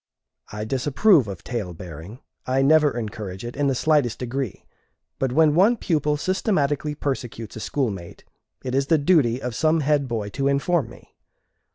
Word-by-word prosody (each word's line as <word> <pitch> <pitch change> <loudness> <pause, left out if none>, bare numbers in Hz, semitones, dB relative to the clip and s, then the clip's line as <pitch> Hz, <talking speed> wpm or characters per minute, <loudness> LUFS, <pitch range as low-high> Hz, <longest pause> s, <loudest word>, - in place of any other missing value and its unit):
I 105 +1 -5
disapprove 135 - +3
of 95 -3 -7
tale 105 -8 -4
bearing, 85 - -10 0.3
I 130 +1 +2
never 150 -2 +4
encourage 105 -3 -6
it 120 - -6
in 145 0 0
the 135 - +1
slightest 145 -4 +2
degree; 125 -2 -4 0.5
but 135 -2 0
when 155 +2 +4
one 200 +9 +4
pupil 150 -6 0
systematically 150 -5 0
persecutes 120 -6 -4
a - - -6
schoolmate, 105 -9 -3 0.4
it 130 - -4
is 135 +1 +1
the 160 - +4
duty 140 -6 +3
of 125 -2 -4
some 155 +5 +2
head 145 -1 +1
boy 110 -4 -3
to 135 +6 -1
inform 140 0 +1
me. 120 - -16
135 Hz, 165 wpm, -23 LUFS, 115-150 Hz, 0.5 s, never